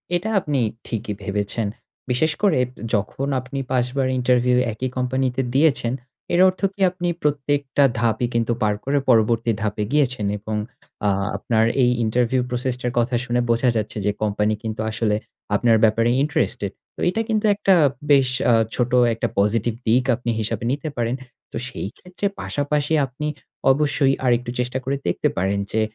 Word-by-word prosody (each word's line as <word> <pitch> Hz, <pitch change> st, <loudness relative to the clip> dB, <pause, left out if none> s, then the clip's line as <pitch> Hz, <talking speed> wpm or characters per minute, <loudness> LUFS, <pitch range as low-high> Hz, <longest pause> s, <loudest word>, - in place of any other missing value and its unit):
এটা 175 Hz, +5 st, -1 dB
আপনি 150 Hz, -7 st, -1 dB, 0.3 s
ঠিকই 110 Hz, -2 st, -3 dB
ভেবেছেন। 105 Hz, +2 st, -2 dB, 0.4 s
বিশেষ 155 Hz, +6 st, +2 dB
করে 195 Hz, -10 st, +3 dB, 0.3 s
যখন 110 Hz, +6 st, -1 dB
আপনি 130 Hz, +2 st, -6 dB
৫ 125 Hz, -2 st, +2 dB
বার 135 Hz, -1 st, +2 dB
ইন্টারভিউ 125 Hz, 0 st, +3 dB, 0.2 s
একই 130 Hz, +4 st, -3 dB
কোম্পানিতে 130 Hz, 0 st, 0 dB
দিয়েছেন 135 Hz, -5 st, +3 dB, 0.4 s
এর 175 Hz, -, +3 dB
অর্থ 185 Hz, 0 st, -1 dB
কি 195 Hz, -, -10 dB
আপনি 175 Hz, -1 st, -4 dB, 0.2 s
প্রত্যেকটা 145 Hz, -1 st, +1 dB, 0.2 s
ধাপই 115 Hz, +1 st, +1 dB
কিন্তু 115 Hz, 0 st, +1 dB
পার 105 Hz, -1 st, +2 dB
করে 140 Hz, +2 st, +1 dB
পরবর্তী 115 Hz, 0 st, +3 dB
ধাপে 105 Hz, -1 st, -1 dB
গিয়েছেন 130 Hz, -7 st, +1 dB
এবং 110 Hz, +1 st, -4 dB, 0.5 s
আ -, -, +4 dB, 0.3 s
আপনার 110 Hz, -1 st, +1 dB, 0.2 s
এই 120 Hz, -, +5 dB
ইন্টারভিউ 120 Hz, +3 st, +1 dB
প্রসেস 125 Hz, 0 st, -1 dB
টার 125 Hz, -, -1 dB
কথা 120 Hz, +1 st, +1 dB
শুনে 120 Hz, 0 st, +1 dB
বোঝা 120 Hz, +2 st, +3 dB
যাচ্ছে 110 Hz, 0 st, -2 dB
যে, 105 Hz, -, +3 dB
কোম্পানি 105 Hz, 0 st, +1 dB
কিন্তু 110 Hz, -1 st, -3 dB
আসলে 110 Hz, -1 st, 0 dB, 0.4 s
আপনার 115 Hz, +1 st, +4 dB
ব্যাপারে 115 Hz, +1 st, +4 dB
ইন্টারেস্টেড। 120 Hz, -8 st, -1 dB, 0.2 s
তো -, -, -15 dB
এটা 220 Hz, +5 st, -1 dB
কিন্তু 220 Hz, -1 st, +1 dB
একটা 195 Hz, -2 st, +3 dB, 0.4 s
বেশ 135 Hz, -3 st, +5 dB, 0.2 s
আ -, -, +5 dB, 0.2 s
ছোট 125 Hz, 0 st, 0 dB, 0.2 s
একটা 115 Hz, +1 st, -1 dB
পজিটিভ 110 Hz, +3 st, +1 dB
দিক 120 Hz, +3 st, +4 dB
আপনি 120 Hz, 0 st, -5 dB
হিসাবে 110 Hz, 0 st, -2 dB
নিতে 145 Hz, +3 st, -2 dB
পারেন। 120 Hz, +1 st, 0 dB, 0.4 s
তো -, -, -4 dB
সেই 130 Hz, -, -5 dB
ক্ষেত্রে 180 Hz, +2 st, -7 dB, 0.2 s
পাশাপাশি 145 Hz, +1 st, -1 dB
আপনি 135 Hz, +4 st, -5 dB, 0.4 s
অবশ্যই 140 Hz, -1 st, +2 dB
আরেকটু 120 Hz, 0 st, +2 dB
চেষ্টা 125 Hz, +1 st, -1 dB
করে 135 Hz, +2 st, -1 dB
দেখতে -, -, +1 dB
পারেন 95 Hz, +2 st, +1 dB
যে 110 Hz, -, +1 dB
125 Hz, 160 wpm, -22 LUFS, 110-140 Hz, 0.5 s, এই